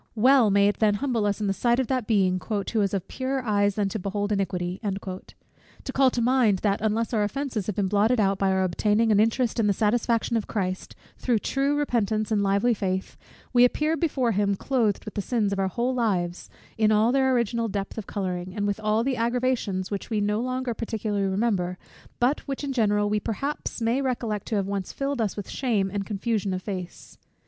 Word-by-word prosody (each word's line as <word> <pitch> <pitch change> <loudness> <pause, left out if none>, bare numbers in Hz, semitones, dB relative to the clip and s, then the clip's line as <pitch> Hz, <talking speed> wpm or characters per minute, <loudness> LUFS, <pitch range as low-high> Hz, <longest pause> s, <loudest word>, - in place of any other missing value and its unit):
Well 250 0 +5
may 200 0 +4
it 205 - -1
then 210 -2 +3
humble 230 -3 0
us 205 0 -1
in - - 0
the 195 - +1
sight 240 +4 +1
of 260 - +1
that 255 -3 -1
Being 185 -4 +2
"who 215 +1 0
is 200 0 0
of 190 -1 -3
purer 265 0 -3
eyes 205 -2 +2
than 205 -2 +1
to 215 - -4
behold 205 +2 -2
iniquity;" 185 -2 -1
to 195 +5 -8
call 270 -1 +4
to 245 - -2
mind 240 -5 +3
that, 200 -2 +1
unless 220 +2 0
our 215 - +2
offences 225 -1 -2
have 210 - -2
been 200 -2 0
blotted 210 +5 +2
out 195 -2 +2
by 195 - +2
our 190 0 +2
obtaining 210 +5 +2
an 205 - +4
interest 230 +2 +1
in 220 - +3
the 200 - +3
satisfaction 230 +2 +1
of 220 - -3
Christ, 185 -3 -3 0.2
through 245 -3 +1
true 275 +6 0
repentance 220 -6 0
and 210 -2 +2
lively 200 +5 +2
faith, 190 -2 -3 0.4
we 245 0 +6
appear 300 +6 +2
before 275 -8 0
him 200 -1 +1
clothed 225 -2 0
with 215 - -7
the 205 - -2
sins 210 -2 0
of 195 - -2
our 190 - +1
whole 240 +6 -1
lives, 185 -8 -1 0.3
in 215 -1 +4
all 215 +2 +4
their 265 0 +3
original 235 -2 0
depth 200 -2 -4
of 220 -4 -6
colouring, 185 -2 -4
and 205 - -1
with 205 0 -1
all 215 +1 +1
the 265 0 -1
aggravations 235 -5 -1
which 200 - -4
we 220 -2 0
no 210 +1 0
longer 255 0 -2
particularly 215 -3 -2
remember, 190 -3 0 0.4
but 255 +5 +2
which, 275 +1 -4
in 280 -1 -2
general, 205 -4 +2
we, 210 0 +1
perhaps, 275 +9 -4
may 235 +4 +1
recollect 235 -6 -2
to 220 - -1
have 200 -2 +1
once 195 -1 -3
filled 275 -2 -2
us 215 -2 -1
with 205 - -5
shame 210 -7 0
and 200 -1 -3
confusion 205 -2 -1
of 185 - -5
face. 185 -4 -7
215 Hz, 215 wpm, -25 LUFS, 200-240 Hz, 0.4 s, we